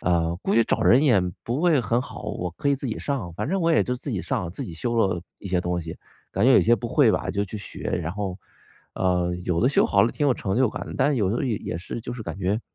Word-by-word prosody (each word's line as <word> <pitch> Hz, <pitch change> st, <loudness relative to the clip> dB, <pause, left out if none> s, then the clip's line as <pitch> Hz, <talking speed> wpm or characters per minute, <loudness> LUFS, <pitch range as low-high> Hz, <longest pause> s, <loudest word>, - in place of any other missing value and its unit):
“呃， 85 Hz, -2 st, +1 dB
估 -, -, 0 dB
计 115 Hz, 0 st, +5 dB
找 -, -, 0 dB
人 130 Hz, +4 st, +5 dB
也 125 Hz, -10 st, +5 dB, 0.2 s
不 120 Hz, +5 st, -1 dB
会 170 Hz, -4 st, +4 dB
很 120 Hz, +2 st, +1 dB
好， -, -, -8 dB
我 90 Hz, 0 st, -3 dB
可 115 Hz, -, -5 dB
以 -, -, +4 dB
自 135 Hz, 0 st, -5 dB
己 115 Hz, -, -3 dB
上。” 135 Hz, -11 st, -3 dB
反 105 Hz, -, -2 dB
正 190 Hz, +3 st, 0 dB
我 165 Hz, -1 st, +2 dB
也 160 Hz, -, +4 dB
就 125 Hz, -, -1 dB
自 130 Hz, +3 st, -6 dB
己 100 Hz, -7 st, -2 dB
上， 85 Hz, 0 st, -2 dB
自 90 Hz, -, -6 dB
己 85 Hz, -, -7 dB
修 120 Hz, +9 st, -2 dB
了 95 Hz, -6 st, +2 dB, 0.2 s
一 -, -, -9 dB
些 90 Hz, -2 st, +1 dB
东 90 Hz, 0 st, -1 dB
西， 80 Hz, 0 st, -8 dB, 0.3 s
感 100 Hz, -, 0 dB
觉 135 Hz, -, +7 dB
有 -, -, +7 dB
些 120 Hz, -, +5 dB
不 110 Hz, -, -5 dB
会 -, -, +4 dB
吧 -, -, -1 dB
就 100 Hz, +1 st, -1 dB
去 105 Hz, +2 st, -7 dB
学。 100 Hz, -, -9 dB, 0.2 s
然 85 Hz, -, -3 dB
后， 100 Hz, -2 st, -3 dB, 0.6 s
呃， 90 Hz, -1 st, +1 dB
有 85 Hz, -2 st, 0 dB
的 125 Hz, -, +4 dB
修 140 Hz, -, +3 dB
好 100 Hz, -, +4 dB
了 115 Hz, -, +2 dB
挺 145 Hz, -, 0 dB
有 130 Hz, -, +3 dB
成 95 Hz, +2 st, -2 dB
就 130 Hz, -1 st, +4 dB
感 -, -, -5 dB
的， -, -, -7 dB
但 -, -, +4 dB
是 145 Hz, -, +1 dB
有 100 Hz, -5 st, +1 dB
的 125 Hz, -, -1 dB
也 105 Hz, -8 st, -3 dB
是， 95 Hz, -, -6 dB
就 120 Hz, -, -6 dB
是 120 Hz, -, -7 dB
感 105 Hz, -, -6 dB
觉， 100 Hz, +3 st, 0 dB
105 Hz, 310 characters per minute, -24 LUFS, 90-125 Hz, 0.6 s, 觉